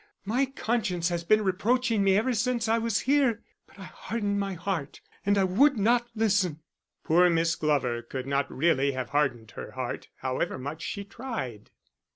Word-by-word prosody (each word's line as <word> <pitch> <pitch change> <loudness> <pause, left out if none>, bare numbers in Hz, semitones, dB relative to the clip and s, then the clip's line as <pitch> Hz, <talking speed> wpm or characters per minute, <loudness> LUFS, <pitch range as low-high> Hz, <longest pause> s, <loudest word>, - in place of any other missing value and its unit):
My 250 +7 +1
conscience 215 -9 -1
has 170 -1 -2
been 215 +5 +3
reproaching 220 +3 +1
me 195 0 +4
ever 245 +4 +1
since 240 0 0
I 225 +1 +2
was 230 -2 0
here, 260 -5 +2 0.2
but - - -21
I 195 - -9
hardened 205 +1 -3
my 195 -1 -2
heart, 170 -5 -4 0.3
and 195 -2 +2
would 280 -2 +6
not 235 +3 +2
listen." 200 -7 +1 0.4
Poor 175 +3 +5
Miss 165 0 +2
Glover 135 -6 0
could 130 +2 -6
not 140 +1 -1
really 140 -2 +2
have 130 -1 -4
hardened 130 -7 0
her - - -8
heart, - - -4
however 130 0 -2
much 145 +5 -6
she 200 +4 -4
tried. 200 - -6
195 Hz, 170 wpm, -27 LUFS, 150-225 Hz, 0.4 s, would